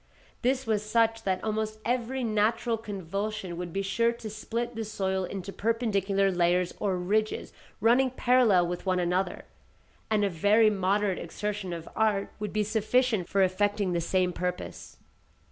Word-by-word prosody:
This 260 +2 +1
was 215 -2 +1
such 225 +1 +2
that 190 -1 0
almost 215 0 -2
every 250 +2 -1
natural 225 +1 +1
convulsion 200 -2 -4
would 175 0 -5
be 195 +3 -2
sure 230 +4 +2
to 230 -2 -7
split 230 +3 -3
the 225 -1 -3
soil 190 -3 -1
into 195 +1 -6
perpendicular 200 -4 +1
layers 175 0 +2
or 195 -3 0
ridges 215 +4 -1 0.3
running 240 +5 +4
parallel 245 -7 +4
with 175 0 -4
one 185 -1 +2
another, 180 +1 -1 0.6
and 210 -2 +2
a - - +1
very 210 +6 +4
moderate 195 0 +1
exertion 210 -3 -4
of 165 -1 -6
art 210 -2 +1
would 210 -2 -3
be 215 0 +1
sufficient 220 -1 +1
for 195 0 +3
effecting 200 0 +1
the 170 - 0
same 180 +1 +1
purpose. 180 0 -5
205 Hz, 155 wpm, -28 LUFS, 185-225 Hz, 0.6 s, running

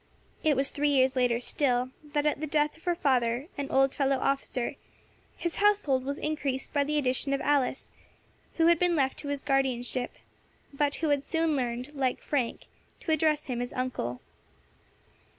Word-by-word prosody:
It 305 -2 +3
was 270 +1 +1
three 295 0 +1
years 265 -1 +3
later 245 -2 +2
still, 250 -1 0 0.2
that, 295 0 +1
at 300 -2 +1
the 310 - -2
death 300 0 +1
of 325 - -21
her 350 -1 +2
father, 255 -2 +1
an 280 -1 -4
old 270 0 +3
fellow 275 -1 +1
officer, 265 -2 -1 0.6
his 340 -1 -3
household 400 -11 +3
was 280 +1 -2
increased 280 -4 -2
by 285 -1 +3
the 300 +1 -1
addition 275 0 +1
of 275 - -4
Alice, 280 -2 0 0.6
who 325 - +3
had 340 -1 +5
been 355 -1 +2
left 270 -3 +1
to 290 - -7
his 285 -1 -2
guardianship, 255 -3 0 0.6
but 285 0 +1
who 320 - -1
had 285 -1 +2
soon 325 -1 0
learned, 250 +2 -3
like 265 -3 0
Frank, 260 -6 -1 0.4
to 320 - -2
address 310 -1 +2
him 245 -2 -3
as 245 - -4
uncle. 240 - -3
275 Hz, 175 wpm, -28 LUFS, 255-300 Hz, 0.6 s, had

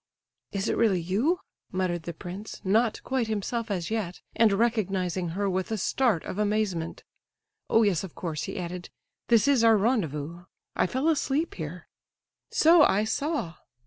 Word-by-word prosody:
"Is 195 +1 -2
it - - 0
really 210 -6 +3
you?" 225 - 0 0.3
muttered 185 -2 -1
the - - -4
prince, 190 +5 -8
not 220 +3 +2
quite 260 -3 -1
himself 220 +2 -2
as 185 -2 -2
yet, 205 -6 -2 0.2
and 225 -2 +5
recognizing 195 -5 0
her 200 0 +1
with 190 -1 -1
a 220 - 0
start 220 -2 +1
of 195 - -5
amazement. 205 -6 -1 0.7
"Oh 225 - +5
yes, 195 -5 +2
of 190 - -8
course," 160 -4 -3
he - - -6
added, 180 0 -5 0.4
"this 230 +2 +4
is 275 -5 +4
our 225 -1 +6
rendezvous. 175 - -1 0.3
I - - +2
fell 260 - -1
asleep 310 0 +1
here." 165 +2 -7 0.6
"So 330 +1 +6
I 210 -7 +4
saw." 275 - -2
205 Hz, 160 wpm, -27 LUFS, 180-230 Hz, 0.7 s, our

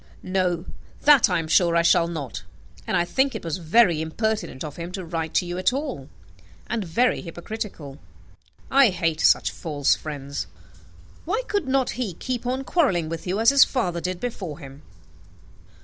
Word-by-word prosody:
"No, 185 -2 0 0.4
that 285 -6 +6
I 180 - +1
am 165 -1 -3
sure 170 +1 +3
I 170 - +4
shall 170 0 +4
not: 140 - -5 0.5
and - - +1
I 175 - +2
think 265 +9 +1
it - - -5
was 165 -1 -3
very 175 -1 +3
impertinent 210 - -2
of 150 -2 -7
him 170 +1 -6
to 190 -2 -5
write 165 -1 -4
to - - +3
you 175 +1 -4
at 185 - +3
all, 265 - -4 0.6
and 225 -2 -2
very 235 +9 +1
hypocritical. 170 -5 -7 0.7
I 275 -3 +6
hate 165 -4 -1
such - - +4
false 145 -5 0
friends. 140 -2 -5 0.8
Why 425 +9 -1
could 405 -9 -1
not 265 -1 +1
he 200 -9 -3
keep 250 +3 -4
on 260 +2 -1
quarrelling 215 - +1
with 165 +2 -6
you, 190 +4 -1
as 230 +3 +6
his 280 0 +8
father 180 -10 -1
did 180 0 -3
before 190 -10 -5
him?" 140 -2 -12
180 Hz, 175 wpm, -24 LUFS, 160-235 Hz, 0.8 s, his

